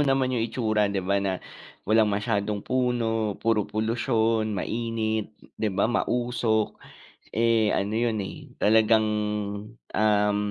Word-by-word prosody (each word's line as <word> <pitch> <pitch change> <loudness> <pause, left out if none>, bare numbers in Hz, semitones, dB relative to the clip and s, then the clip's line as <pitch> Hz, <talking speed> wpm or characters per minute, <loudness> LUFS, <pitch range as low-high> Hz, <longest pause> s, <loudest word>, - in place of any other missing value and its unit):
naman 135 -1 +2
yung 120 - 0
itsura, 110 -2 +1
'di 100 -2 -2
ba, 100 +1 +1
na 95 -1 -1 0.5
walang 110 +1 +4
masyadong 105 0 -1
puno, 115 -4 0
puro 110 -3 0
polusyon, 110 -1 0
mainit, 110 -1 -2 0.2
'di 110 - +1
ba, - - +3
mausok, 120 -2 0 0.6
eh, 115 -2 +3
ano 100 +1 -1
yun, 110 -2 0
eh - - -8
talagang, 110 +1 +4 0.9
um, 105 -1 +2
110 Hz, 120 wpm, -26 LUFS, 105-115 Hz, 0.9 s, walang